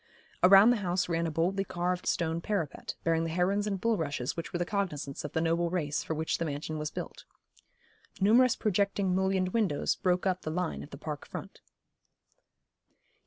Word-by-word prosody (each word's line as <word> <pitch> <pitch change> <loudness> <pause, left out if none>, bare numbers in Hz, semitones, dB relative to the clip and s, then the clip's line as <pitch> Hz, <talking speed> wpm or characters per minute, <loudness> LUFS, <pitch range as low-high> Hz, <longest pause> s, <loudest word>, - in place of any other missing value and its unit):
Around 195 +5 +8
the 245 - +2
house 180 -2 0
ran 170 -1 0
a - - -1
boldly 175 +5 0
carved 180 -1 -2
stone 165 0 0
parapet, 170 -7 -3
bearing 165 -1 +2
the 165 - -2
herons 190 +5 +1
and 195 -2 -2
bulrushes 160 - -1
which 165 - -5
were 175 - -2
the 175 - -1
cognisance 170 -9 -3
of 150 - -6
the 160 - +1
noble 170 +1 +1
race 155 -4 -1
for 160 - -3
which 160 +1 -1
the 170 - 0
mansion 150 +1 -4
was 150 0 -2
built. - - -7 1.0
Numerous 235 +5 +5
projecting 200 -2 +1
mullioned 190 0 +1
windows 190 -8 +1
broke 180 0 0
up 185 -1 0
the - - -4
line 175 +1 -2
of - - -10
the 140 - -9
park 150 -1 -6
front. - - -8
175 Hz, 180 wpm, -30 LUFS, 160-195 Hz, 1.0 s, Around